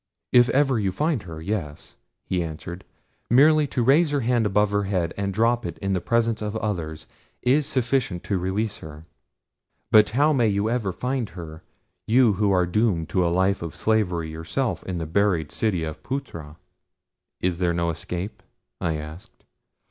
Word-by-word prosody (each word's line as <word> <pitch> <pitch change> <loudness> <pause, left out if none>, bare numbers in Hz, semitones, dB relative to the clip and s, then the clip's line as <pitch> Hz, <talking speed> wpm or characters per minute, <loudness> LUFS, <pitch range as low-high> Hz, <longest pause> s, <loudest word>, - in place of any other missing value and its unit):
"If 120 0 +6
ever 135 -3 +2
you 100 -3 0
find 150 - 0
her, 80 -1 -7
yes," 80 -4 -5 0.3
he 90 -1 -1
answered. 85 +2 -7 0.4
"Merely 150 +4 +5
to 125 -3 -1
raise 150 +6 +4
her 145 -1 0
hand 120 -2 +2
above 105 +1 +2
her 100 0 +1
head 90 -4 -1
and 100 -1 -2
drop 115 +4 +2
it - - -5
in 100 -1 -2
the 90 - 0
presence 115 +1 +1
of 105 0 -3
others 80 -8 -3 0.4
is 135 +4 +3
sufficient 125 -7 0
to 100 - -1
release 95 +4 -2
her; 75 0 -11 0.9
but 105 -2 +7
how 150 +2 +4
may 120 -5 +3
you 105 +2 0
ever 115 -6 -1
find 125 +2 -2
her, 80 -2 -8 0.5
you 115 -1 +5
who 100 +1 +1
are 90 -2 +3
doomed 90 -3 0
to 90 - +1
a 85 - +2
life 95 +3 +1
of 85 -1 -6
slavery 90 -7 0
yourself 80 +11 -2
in 90 -2 -3
the 80 - -3
buried 85 -2 +1
city 95 -7 0
of 80 -1 -6
Phutra?" 85 - -6 0.8
"Is 90 -1 -1
there 90 -2 +2
no 85 0 0
escape?" 90 +5 -5 0.4
I 80 -2 0
asked. 75 +4 -9
100 Hz, 175 wpm, -24 LUFS, 85-120 Hz, 0.9 s, but